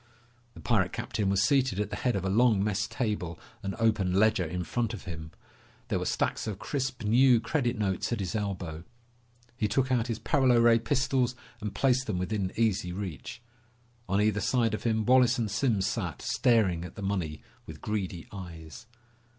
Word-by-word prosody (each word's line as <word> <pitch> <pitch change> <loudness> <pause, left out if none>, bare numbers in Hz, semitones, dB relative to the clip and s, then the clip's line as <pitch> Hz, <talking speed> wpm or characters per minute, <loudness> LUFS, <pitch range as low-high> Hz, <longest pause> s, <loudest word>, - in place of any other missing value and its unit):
The - - -11
pirate - - +1
captain 100 -3 -2
was 95 0 +2
seated 130 -6 +2
at 105 0 -2
the - - -2
head 125 -2 0
of 95 -1 -2
a - - +1
long 110 -2 +4
mess 105 +1 0
table, 105 -8 -3 0.2
an 95 -2 -4
open 110 -5 +2
ledger 105 0 +3
in 90 +2 -3
front 115 +7 -2
of 105 - -10
him. 80 -2 -7 0.6
There - - 0
were - - -3
stacks - - -1
of 105 -3 -3
crisp 130 -2 -3
new 120 +3 +5
credit 125 -2 -1
notes 95 -1 -1
at 120 - -1
his 95 0 -3
elbow. 90 -6 -3 0.7
He 110 -3 0
took 130 +5 0
out 120 -2 +2
his 115 -3 -2
paralo 130 0 +3
ray 115 0 +5
pistols 130 0 +1 0.3
and 105 -1 -5
placed 130 -1 +2
them 105 -4 -1
within 95 +1 -2
easy 105 -5 +1
reach. 95 +4 -6 0.7
On 100 +1 +2
either 105 0 +2
side 115 +1 +1
of 105 - -4
him, 110 -2 +1
Wallace 125 +1 +5
and 110 -4 -1
Simms 110 -3 +1
sat, 95 - -3
staring 100 -9 +2
at 90 - -9
the 105 - -7
money 90 -6 -2 0.2
with - - -9
greedy 95 -5 -3
eyes. 90 +3 -9
105 Hz, 185 wpm, -29 LUFS, 95-120 Hz, 0.7 s, new